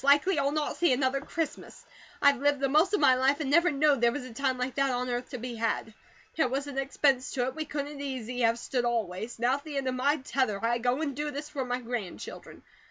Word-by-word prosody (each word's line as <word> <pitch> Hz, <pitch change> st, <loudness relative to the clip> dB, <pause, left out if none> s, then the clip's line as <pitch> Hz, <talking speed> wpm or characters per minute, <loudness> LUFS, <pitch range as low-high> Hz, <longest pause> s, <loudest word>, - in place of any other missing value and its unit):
Likely 290 Hz, +5 st, +4 dB
I'll 280 Hz, 0 st, +2 dB
not 300 Hz, 0 st, -2 dB
see 345 Hz, -4 st, +3 dB
another 260 Hz, +1 st, +1 dB
Christmas. 315 Hz, +1 st, -5 dB, 0.4 s
I've 280 Hz, -2 st, +5 dB
lived 285 Hz, -1 st, +2 dB
the 275 Hz, -, +1 dB
most 310 Hz, +7 st, +3 dB
of -, -, 0 dB
my 270 Hz, -3 st, +6 dB
life, 265 Hz, +3 st, +2 dB
and 285 Hz, -3 st, -2 dB
never 340 Hz, +4 st, +5 dB
knowed 285 Hz, -2 st, +2 dB
there 235 Hz, 0 st, +4 dB
was 255 Hz, +1 st, -5 dB
a 255 Hz, -, -10 dB
time 265 Hz, +1 st, 0 dB
like 250 Hz, +1 st, -2 dB
that 275 Hz, +1 st, +1 dB
on 250 Hz, 0 st, -1 dB
earth 245 Hz, +1 st, -3 dB
to 255 Hz, -, -5 dB
be 245 Hz, +1 st, -5 dB
had. 225 Hz, -1 st, -1 dB, 0.4 s
There 315 Hz, -, +2 dB
wasn't 275 Hz, +1 st, -2 dB
expense 270 Hz, -2 st, +1 dB
to 250 Hz, -2 st, 0 dB
it 260 Hz, -, -3 dB
we 310 Hz, +2 st, -4 dB
couldn't 290 Hz, -1 st, -5 dB
easy 250 Hz, -3 st, -4 dB
have 230 Hz, 0 st, +3 dB
stood, 245 Hz, +1 st, -2 dB
always. 225 Hz, -2 st, -2 dB
Now, 245 Hz, +4 st, +2 dB
at 285 Hz, -, -13 dB
the 300 Hz, -3 st, -5 dB
end 270 Hz, -1 st, -1 dB
of 255 Hz, -, 0 dB
my 280 Hz, +4 st, +2 dB
tether, 260 Hz, -6 st, -1 dB
I 240 Hz, +1 st, +1 dB
go 250 Hz, +5 st, 0 dB
and 280 Hz, -4 st, -2 dB
do 295 Hz, +1 st, -2 dB
this 295 Hz, +1 st, -6 dB
for 275 Hz, -4 st, -3 dB
my 250 Hz, 0 st, -2 dB
grandchildren. 230 Hz, -6 st, -6 dB
270 Hz, 245 wpm, -29 LUFS, 245-285 Hz, 0.4 s, my